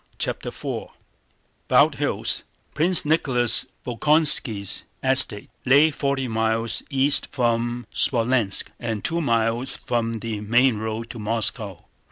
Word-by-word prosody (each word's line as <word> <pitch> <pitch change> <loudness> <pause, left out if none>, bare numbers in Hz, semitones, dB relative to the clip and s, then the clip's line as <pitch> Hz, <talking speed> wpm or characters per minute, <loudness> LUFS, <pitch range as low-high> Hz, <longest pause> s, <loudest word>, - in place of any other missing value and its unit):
CHAPTER - - -4
IV - - -5 0.8
Bald - - +4
Hills, - - -1 0.3
Prince 165 +3 +2
Nicholas 130 -6 +1 0.2
Bolkónski's 130 - +2 0.2
estate, 130 -6 +2
lay 145 +5 +5
forty 140 -2 -2
miles 115 0 0
east 140 0 +2
from 120 -2 -1
Smolénsk 115 -4 +1
and 110 -3 -4
two 170 +1 -1
miles 115 -1 0
from 115 -1 -3
the 110 -1 -4
main 120 +2 +2
road 110 +1 -5
to 120 - -9
Moscow. 105 -3 -2
120 Hz, 115 wpm, -23 LUFS, 110-135 Hz, 0.8 s, lay